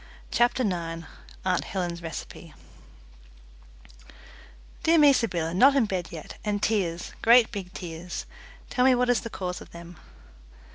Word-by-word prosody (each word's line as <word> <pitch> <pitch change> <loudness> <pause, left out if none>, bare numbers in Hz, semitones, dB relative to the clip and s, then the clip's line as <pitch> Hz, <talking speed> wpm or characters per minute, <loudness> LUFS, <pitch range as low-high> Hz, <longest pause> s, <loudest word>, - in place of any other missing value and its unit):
CHAPTER 240 +1 +2
NINE 170 -5 -3 0.4
Aunt 185 -1 +1
Helen's 175 -3 -4
Recipe 165 -2 -8 2.3
"Dear 330 +1 +4
me, 295 -2 +7
Sybylla, 170 -10 -1
not 270 +10 +6
in 265 -5 +4
bed 185 -4 -3
yet, 160 -3 -9
and 210 -1 -1
tears, 190 -6 -1
great 235 0 +6
big 195 -4 -6
tears! 175 -1 -6 0.5
Tell 250 - +2
me 260 0 +6
what 250 0 +1
is 245 - +1
the 230 - -6
cause 180 -4 -5
of - - -12
them." 170 0 -11
190 Hz, 140 wpm, -26 LUFS, 170-240 Hz, 2.3 s, me